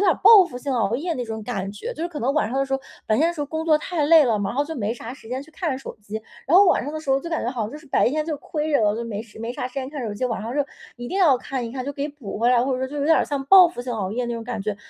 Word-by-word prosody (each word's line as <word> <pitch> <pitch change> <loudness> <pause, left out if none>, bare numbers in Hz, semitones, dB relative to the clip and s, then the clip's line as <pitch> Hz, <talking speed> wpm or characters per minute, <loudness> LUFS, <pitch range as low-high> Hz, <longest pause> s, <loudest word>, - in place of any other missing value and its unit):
点 395 -3 +4
儿 - - +3
报 425 -1 +9
复 250 -8 -8
性 275 +2 -3
熬 225 -4 +1
夜 330 +7 -2
那 250 -3 -3
种 220 -1 -5
感 195 -4 -4
觉。 335 - -6
就 325 - -6
是 340 - -1
可 310 -4 -7
能 260 +4 +1
晚 300 -6 +1
上 260 - -3
的 275 - +2
时 270 - -6
候 270 - +1 0.3
白 215 - +2
天 320 - +3
的 345 - -3
时 310 - -6
候 - - 0
工 320 +2 -3
作 310 - +5
太 315 -1 -1
累 320 -2 +7
了， 225 -4 +1
然 195 +4 -3
后 285 - +1
就 320 +2 -6
没 220 -1 -1
啥 235 0 -8
时 240 -5 -13
间 255 +3 -3
去 315 - -17
看 315 -4 -3
手 270 - -8
机， 205 +1 -11 0.3
然 330 +6 +5
后 400 - +8
晚 355 - +3
上 290 - -4
的 310 - -4
时 280 -3 -3
候 270 - +3
就 335 - -6
感 325 - -2
觉 240 - 0
好 245 -4 -3
像 210 - -4
就 290 - -8
是 305 - -17
白 270 - +3
天 305 +4 -1
就 310 -2 -3
亏 305 +1 -3
着 280 - +4
了， 205 -1 +3
就 235 - -3
没 210 -3 -4
时 225 -2 -16
没 230 +2 -4
啥 250 - -4
时 255 - -21
间 270 -1 -4
看 285 -3 -5
手 210 - -4
机， 255 - -2
晚 230 -3 -2
上 235 +4 -5
就 290 - +1 0.3
一 240 0 -7
定 385 - -2
要 305 -9 +5
看 255 -1 -4
一 - - -7
看， 255 -1 -4
就 285 - -4
给 280 +1 -3
补 275 -10 -8
回 235 +2 +3
来， 245 -1 +4
或 270 - 0
者 255 - -1
说 260 - -1
就 290 - -7
有 285 - -1
点 320 +1 +5
儿 - - +2
像 280 -2 -3
报 370 +1 +8
复 290 -8 -7
性 245 -1 -4
熬 200 -4 -2
夜 245 +1 -1
那 240 - -3
种 230 - -5
感 230 -4 -4
觉。 210 0 -2
265 Hz, 410 characters per minute, -23 LUFS, 235-305 Hz, 0.3 s, 报